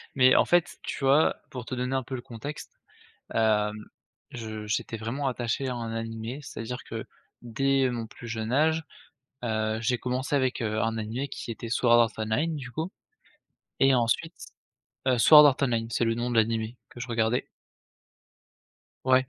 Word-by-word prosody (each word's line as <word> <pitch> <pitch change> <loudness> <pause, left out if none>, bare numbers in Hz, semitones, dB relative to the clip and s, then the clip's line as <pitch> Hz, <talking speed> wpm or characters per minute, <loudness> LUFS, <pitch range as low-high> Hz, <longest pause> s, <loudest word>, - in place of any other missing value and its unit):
mais, 130 -1 +6
en - - +5
fait, 175 -1 +2
tu - - -4
vois, 140 +4 +4 0.2
pour 125 -3 -6
te 130 - -6
donner 125 +1 -1
un 130 - 0
peu 130 - -8
le 120 - -5
contexte, 120 +6 -8 0.6
hem, 105 -2 +2 0.6
je 110 -3 -6
j'étais 110 +1 -2
vraiment 130 +6 -2
attaché 125 +2 -2
à 125 - -2
un 115 -2 -4
animé, 115 +3 -5
c'est-à-dire 125 -2 -6
que 110 -1 -6 0.4
dès 135 +3 +1
mon 115 -2 -4
plus 120 +1 -11
jeune 110 0 -3
âge, 160 +3 +2 0.6
heu, 110 -1 0
j'ai 120 +2 +1
commencé 130 +4 -1
avec, 130 -2 0
heu, 110 -1 -1
un 115 0 0
animé 110 +5 -3
qui - - -7
était 115 +1 -6
Sword 120 0 +3
Art 115 - +1
Online 110 +10 0
du 130 -3 -7
coup 160 +7 -3 0.9
et 135 0 +6
ensuite 125 +8 0 0.7
heu, 125 -2 +4
Sword 150 +5 +9
Art 135 -2 +3
Online 115 -4 +1
c'est 120 - +1
le 115 0 +1
nom 120 +1 -2
de - - -2
l'animé 110 +1 +1
que - - -12
je 120 - -5
regardais 115 0 0 1.6
ouais, 130 0 +4
120 Hz, 175 wpm, -27 LUFS, 115-130 Hz, 1.6 s, Sword